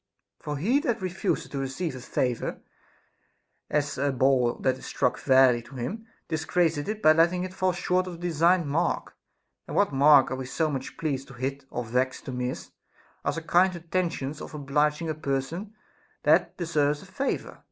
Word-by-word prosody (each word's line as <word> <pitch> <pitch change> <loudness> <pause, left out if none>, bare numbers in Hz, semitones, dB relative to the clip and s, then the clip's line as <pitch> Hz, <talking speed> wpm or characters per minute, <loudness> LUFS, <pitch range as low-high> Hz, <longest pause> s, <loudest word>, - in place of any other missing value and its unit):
For 150 -1 -4
he 230 - +2
that 240 -7 -1
refuseth 190 +1 -2
to 140 - -3
receive 135 +4 -3
a - - -7
favor, 125 -1 -2 1.1
as 145 -2 -1
a 140 +1 +1
ball 130 -2 +3
that 130 0 0
is - - -11
struck 125 - +1
fairly 130 -3 +4
to 125 +4 -14
him, 210 - -5 0.2
disgraceth 160 -1 0
it 215 0 -4
by 155 - +8
letting 170 +3 +3
it 185 0 -5
fall 185 0 +1
short 180 +1 0
of 180 - -5
the - - -9
designed 170 +2 +3
mark; 150 +4 -1 0.5
and - - -6
what 200 -7 +2
mark 140 0 +6
are - - 0
we 130 -1 -5
so 155 +3 0
much 135 -2 -5
pleased 140 -4 -2
to 135 - -12
hit 135 +2 -4
or 120 - -3
vexed 125 +3 -1
to - - -5
miss, 125 0 -4 0.5
as - - -1
our 165 - -4
kind 180 +3 +3
intentions 165 -4 -2
of - - -8
obliging 150 +3 0
a 155 - -1
person 155 +8 -3 0.5
that 160 +4 +3
deserves 150 -4 0
a - - -13
favor'? 265 +9 -3
150 Hz, 185 wpm, -27 LUFS, 135-175 Hz, 1.1 s, by